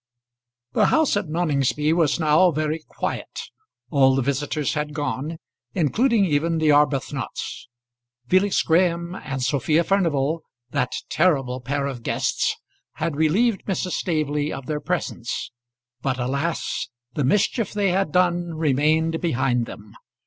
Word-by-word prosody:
The - - +3
house 315 -7 +3
at 205 -4 -1
Noningsby 150 -2 +1
was 165 -2 +2
now 160 +3 +5
very 155 0 -1
quiet. - - -4 0.5
All 135 -2 +5
the 135 - +1
visitors 145 +2 -1
had 150 -1 -3
gone, 145 +2 -3 0.4
including 215 - +3
even 165 0 +1
the 160 -1 +2
Arbuthnots. 145 -3 0 0.6
Felix 185 +4 +3
Graham 170 +1 +2
and 135 -7 -4
Sophia 150 +5 +2
Furnival, 165 -5 +1 0.3
that 125 -4 0 0.2
terrible 135 -7 +1
pair 140 +3 -2
of 135 -4 -4
guests, - - 0 0.4
had 165 - -2
relieved 195 +9 +2
Mrs. 185 -1 -2
Staveley 150 -4 -1
of 135 - -6
their 150 +1 -2
presence; 155 -11 -3 0.5
but, 130 -1 -1
alas! 140 +3 -2 0.2
the 145 - -1
mischief 205 - +1
they 205 -2 +1
had 190 -4 0
done 175 -1 +1
remained 155 +2 +1
behind 125 -7 +1
them. 105 0 -11
155 Hz, 130 wpm, -23 LUFS, 140-175 Hz, 0.6 s, now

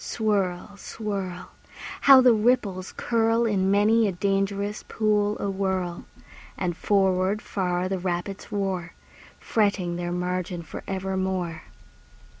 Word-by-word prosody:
Swirl, 200 -3 -1
swirl! 195 -4 -5 0.6
How 270 -1 +10
the 250 -2 +6
ripples 210 -5 +1
curl 230 0 +2
In 195 -4 +1
many 215 +3 +4
a - - 0
dangerous 195 +2 -1
pool 210 -1 +1
awhirl! 190 -3 -2 0.5
And 175 -2 -2
forward 190 +1 +2
far 180 -3 -2
the 190 0 -2
rapids 180 +2 -4
roar, 190 -4 -2 0.4
Fretting 195 -5 0
their 175 0 -3
margin 180 0 -3
for - - -8
evermore. 190 -3 -2
195 Hz, 110 wpm, -25 LUFS, 180-210 Hz, 0.6 s, How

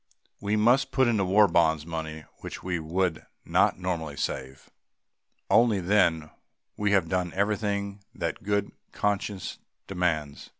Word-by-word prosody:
We 100 +1 0
must 125 +5 +4
put 130 -1 +3
into 110 -4 +2
War 100 +3 +5
Bonds 80 -3 +2
money 80 -1 -5
which - - -8
we 90 -2 -1
would 85 +1 -1 0.2
not - - +3
normally 85 -5 -3
save. 65 +1 -4 0.8
Only 110 -3 +4
then 90 -3 +3
have 75 - -15 0.4
we 105 0 0
done 90 -2 +1
everything 100 0 -1
that - - -3
good 100 0 -1 0.2
conscience 100 -2 -2 0.3
demands. 85 -6 -2
95 Hz, 130 wpm, -27 LUFS, 80-105 Hz, 0.8 s, War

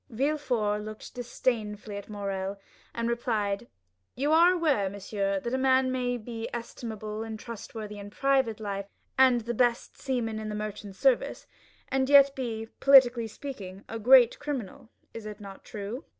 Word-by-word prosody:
Villefort 245 -5 0
looked 215 0 -9
disdainfully 225 -4 -2
at 200 +1 -7
Morrel, 200 -1 -3 0.4
and 235 0 -1
replied 220 -4 0
coldly: 235 - -17 0.5
"You 285 +4 0
are 335 +3 +7
aware, 300 - +1
monsieur, 195 0 -2
that 235 +5 -4
a 260 - +1
man 260 0 +3
may 250 -1 -1
be 230 0 -6
estimable 220 -2 -6
and 220 -1 -5
trustworthy 215 -2 -7
in 200 0 -8
private 265 -2 +1
life, 200 -2 -4 0.3
and 260 -2 +5
the 235 +2 -3
best 240 0 0
seaman 235 -5 -1
in 215 0 -5
the 210 - -4
merchant 210 -2 -6
service, 260 +4 +1 0.4
and 265 0 +1
yet 280 -1 +7
be, 225 -4 -4
politically 250 -4 +6
speaking, 205 -6 -8
a 225 - -5
great 245 +1 +6
criminal. 260 -8 -5 0.2
Is 225 -2 -7
it 210 0 -8
not 195 -2 -10
true?" 215 +7 -6
230 Hz, 160 wpm, -28 LUFS, 210-260 Hz, 0.5 s, are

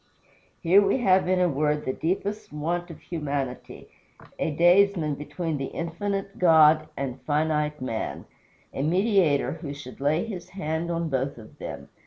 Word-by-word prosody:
Here 180 +4 +6
we 200 +5 +2
have 190 -7 +3
in 185 0 +2
a 180 - +4
word 150 0 0
the 130 - -1
deepest 200 +7 -3
want 170 +4 -2
of 165 - -10
humanity: 140 -6 -4 0.5
a - - 0
daysman 175 0 +4
between 155 +2 -4
the 135 - -2
infinite 195 +4 -4
God 155 -3 +6
and 135 -2 -4
finite 150 +2 0
man; 115 -4 -4 0.5
a - - -3
Mediator 180 -2 +2
who 145 -4 -5
should 135 -2 -10
lay 150 +6 +1
his 185 -5 -7
hand 165 -2 -3
on 170 -1 -1
both 135 0 -1
of 110 -2 -14
them! - - -7
160 Hz, 155 wpm, -26 LUFS, 145-180 Hz, 0.5 s, Here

